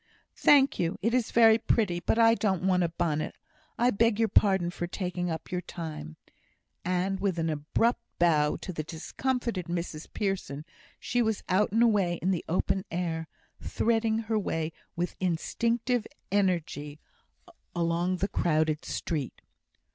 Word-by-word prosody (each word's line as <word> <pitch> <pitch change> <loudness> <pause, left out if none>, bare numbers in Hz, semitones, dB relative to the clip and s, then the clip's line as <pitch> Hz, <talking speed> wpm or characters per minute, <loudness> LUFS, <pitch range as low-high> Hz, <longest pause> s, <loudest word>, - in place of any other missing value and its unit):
"Thank 280 -2 +5
you. 170 -1 0
It 230 +2 +1
is 250 -3 +1
very 225 -1 +6
pretty. 205 -6 +1
But 200 - 0
I 230 -1 +6
don't 190 -6 0
want 185 -1 +3
a 170 - +1
bonnet. 155 -2 -2 0.4
I 245 +2 +3
beg 225 0 +2
your 225 -1 +2
pardon 190 -4 +3
for 175 0 -4
taking 180 -1 -3
up 160 -1 -5
your 180 0 -1
time." 155 - -7 0.7
And 185 +2 0
with 195 -3 0
an 165 -1 0
abrupt 155 +11 0 0.2
bow 155 -4 +3
to 185 - -5
the 155 - -3
discomfited 190 - -3
Mrs 170 -2 -4
Pearson, 190 -8 -3 0.3
she 245 - 0
was 220 -2 0
out 190 +3 +2
and 225 +3 +4
away 200 -7 +2
in 185 - +1
the 180 - -1
open 190 +2 0
air, 165 -2 -2 0.3
threading 225 -1 +1
her 220 -1 0
way 160 -5 -2 0.2
with 175 +1 -2
instinctive 230 +7 0 0.2
energy 170 -7 0 0.8
along 170 +2 +1
the 195 - 0
crowded 155 -4 +1
street. 150 -6 -3
180 Hz, 150 wpm, -28 LUFS, 165-220 Hz, 0.8 s, very